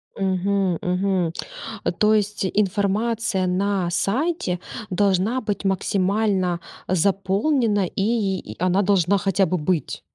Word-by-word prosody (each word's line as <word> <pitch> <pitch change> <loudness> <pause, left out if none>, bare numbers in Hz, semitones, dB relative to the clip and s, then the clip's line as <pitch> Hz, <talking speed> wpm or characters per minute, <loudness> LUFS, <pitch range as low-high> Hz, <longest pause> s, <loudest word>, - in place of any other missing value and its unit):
Мгм, 190 -1 0
мгм. 180 -2 0 0.7
То 215 0 +4
есть 210 -2 0
информация 200 0 0
на 190 -1 0
сайте 210 - 0 0.3
должна 200 +5 +1
быть 205 -2 -3
максимально 190 -1 +1 0.3
заполнена, 200 - +1
и 200 0 0
и 105 - -9
она 185 +2 +2
должна 195 -1 +3
хотя 195 0 +2
бы 180 - -1
быть? 165 +1 -1
195 Hz, 105 wpm, -23 LUFS, 185-205 Hz, 0.7 s, То